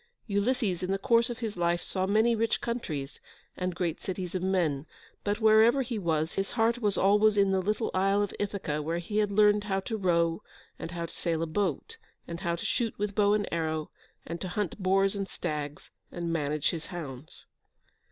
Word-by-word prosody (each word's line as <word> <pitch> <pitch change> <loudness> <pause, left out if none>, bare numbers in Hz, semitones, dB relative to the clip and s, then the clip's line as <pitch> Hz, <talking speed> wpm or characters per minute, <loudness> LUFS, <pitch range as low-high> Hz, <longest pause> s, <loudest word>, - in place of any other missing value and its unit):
Ulysses 205 -2 0
in 180 - -3
the 195 - +1
course 230 +2 +3
of 240 - -4
his 225 -3 -4
life 175 0 +1
saw 185 -1 -2
many 220 +4 +3
rich 225 0 +1
countries, 155 - -4 0.4
and 180 -1 -2
great 175 -2 -2
cities 185 -2 -4
of 185 - -1
men, 170 -6 0 0.4
but, 205 +1 -1
wherever 220 +4 +5
he 235 -3 -3
was, 160 -3 0
his 195 0 -1
heart 230 +1 +2
was 210 -4 0
always 210 +2 +4
in 195 -1 +4
the 190 -1 +2
little 210 +4 -1
isle 195 +2 +3
of 205 - -4
Ithaca, 195 -7 -2
where 165 +3 -2
he 190 +5 -3
had 210 -1 +1
learned 210 0 +4
how 195 -2 0
to 220 +3 -3
row, 170 -4 +1 0.4
and - - -5
how 170 -1 -4
to - - -11
sail 165 -2 -1
a - - +1
boat, 205 - -2 0.3
and 170 0 -5
how 170 -3 -1
to 170 - -6
shoot 230 -3 -1
with 205 0 -2
bow 205 0 +3
and 210 -1 -1
arrow, 160 -2 -2 0.3
and 170 +1 -6
to 185 - -3
hunt 195 +1 -3
boars 195 +1 +3
and 195 -1 -2
stags, 150 -1 -5 0.2
and 170 -1 -3
manage 150 -2 0
his 165 -2 -6
hounds. 150 -5 -8
190 Hz, 200 wpm, -29 LUFS, 170-210 Hz, 0.4 s, wherever